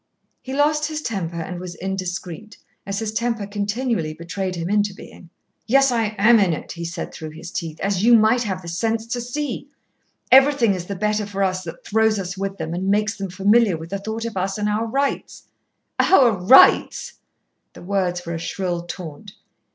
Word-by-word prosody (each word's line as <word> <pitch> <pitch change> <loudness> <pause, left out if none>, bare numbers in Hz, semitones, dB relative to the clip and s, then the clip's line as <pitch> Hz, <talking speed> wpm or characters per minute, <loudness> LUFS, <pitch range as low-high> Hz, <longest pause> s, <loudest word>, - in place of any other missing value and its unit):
He 260 - -8
lost 300 +2 +2
his 310 -1 -5
temper 175 -6 -3
and 175 +2 -5
was 180 -1 -7
indiscreet, 190 +1 -5 0.3
as 195 0 -2
his 220 0 -2
temper 230 -1 -1
continually 205 -4 -2
betrayed 185 +3 -4
him 170 0 -4
into 205 0 +1
being. 175 - -13 0.4
"Yes, 275 +2 +4
I 225 -3 0
am 230 +3 +6
in 190 -5 +3
it," - - -6
he 170 0 -6
said 170 0 -5
through 155 - -7
his 160 +3 -10
teeth, 160 -3 -5
"as 195 -1 0
you 235 +1 +7
might 220 +3 +3
have 190 -5 -3
the - - -9
sense 225 +6 -1
to 240 +1 -3
see. 275 +2 -4 0.6
Everything 265 -5 +6
is 180 -2 -5
the 200 - -4
better 210 +1 -1
for 200 -1 -2
us 185 -1 -1
that 165 - -9
throws 220 0 +2
us 190 -1 -4
with 195 0 -4
them, 160 0 -4
and 185 +2 -3
makes 215 +2 +1
them 195 -2 -5
familiar 200 +1 +3
with 160 +1 -10
the 200 - -2
thought 220 +3 -4
of 230 -2 -5
us 195 +2 -1
and 210 0 -1
our 215 +2 0
rights." 275 +4 -2 0.6
"Our 260 -10 +5
rights," 200 +6 +5 0.5
the - - -12
words 180 -2 -1
were 170 - -4
a 165 - -3
shrill 175 0 -3
taunt. 180 +3 -8
200 Hz, 195 wpm, -22 LUFS, 180-225 Hz, 0.6 s, you